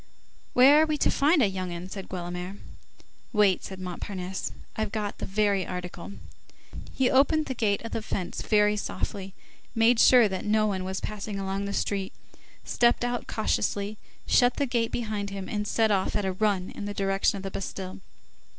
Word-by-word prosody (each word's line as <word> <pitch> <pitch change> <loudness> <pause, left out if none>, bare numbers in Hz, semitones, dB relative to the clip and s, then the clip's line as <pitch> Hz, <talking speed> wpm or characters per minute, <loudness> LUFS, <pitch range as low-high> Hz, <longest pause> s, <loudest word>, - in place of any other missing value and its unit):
"Where 275 +5 +7
are - - +5
we 305 -1 0
to - - +2
find 295 0 +4
a - - +4
young 185 -2 -4
'un?" 175 +1 -6
said 190 0 -8
Guelemer. 180 +1 -5 0.7
"Wait," 205 -4 +3
said 190 -1 -7
Montparnasse. 185 +1 -5 0.2
"I've 220 -2 -2
got 210 -2 -3
the - - -4
very 200 -1 +1
article." 180 +1 -6 0.8
He 260 -1 +1
opened 290 +4 +4
the 265 - -3
gate 210 -4 0
of 230 - -6
the - - -2
fence 190 -4 -4
very 210 -1 +3
softly, 195 -1 -4 0.4
made 230 +1 +4
sure 245 -3 +7
that 190 -2 -4
no 215 0 +2
one 190 -3 -1
was 190 +1 -3
passing 210 -1 -4
along 195 +1 -2
the 200 - -3
street, 195 -1 -2 0.5
stepped 240 0 +2
out 245 0 -2
cautiously, 210 -1 -1 0.3
shut 245 0 +4
the 285 - 0
gate 235 -3 0
behind 215 -4 -3
him, 195 -1 -6
and 210 -2 -2
set 220 0 +2
off 190 -2 +1
at 205 - 0
a 190 - 0
run 190 -1 0
in 205 - -7
the 205 0 -5
direction 195 +1 +1
of 195 - -7
the 195 - -4
Bastille. 190 -1 -5
205 Hz, 185 wpm, -27 LUFS, 190-225 Hz, 0.8 s, Where